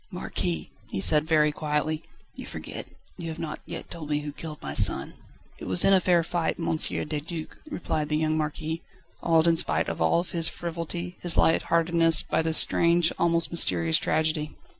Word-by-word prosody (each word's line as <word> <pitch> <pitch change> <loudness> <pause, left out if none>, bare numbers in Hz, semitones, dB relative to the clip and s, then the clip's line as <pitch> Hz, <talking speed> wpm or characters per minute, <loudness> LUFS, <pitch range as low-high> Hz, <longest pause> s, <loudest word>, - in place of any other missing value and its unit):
"Marquis," 80 -3 -3 0.2
he - - -4
said 150 +10 +4
very 155 -2 +3
quietly, 150 +1 -2 0.3
"you - - -9
forget - - -7 0.3
you 165 -1 -5
have 160 - -6
not 155 -2 -5
yet - - -8
told 160 -3 -7
me 150 0 0
who 145 0 -6
killed 155 +1 -8
my 70 - -6
son." - - +4 0.5
"It - - -8
was 90 -1 +4
in 195 - +5
a 190 - +6
fair 175 -2 +2
fight, 170 0 -2
M. 165 -1 -1
de 150 -1 0
Duc," 160 +1 -7
replied 160 - -3
the 150 - +1
young 155 0 0
Marquis, 155 +1 -3 0.4
awed 165 -1 +3
in 165 -1 +3
spite - - +1
of - - -5
all 80 - +2
his 170 -2 +2
frivolity, 170 +1 -6
his 175 -2 -1
light 160 - +4
heartedness, 165 0 +3
by - - 0
this 160 0 +3
strange, 170 0 +3
almost 170 0 +2
mysterious 85 - +1
tragedy. 155 -1 -1
160 Hz, 185 wpm, -26 LUFS, 150-170 Hz, 0.5 s, a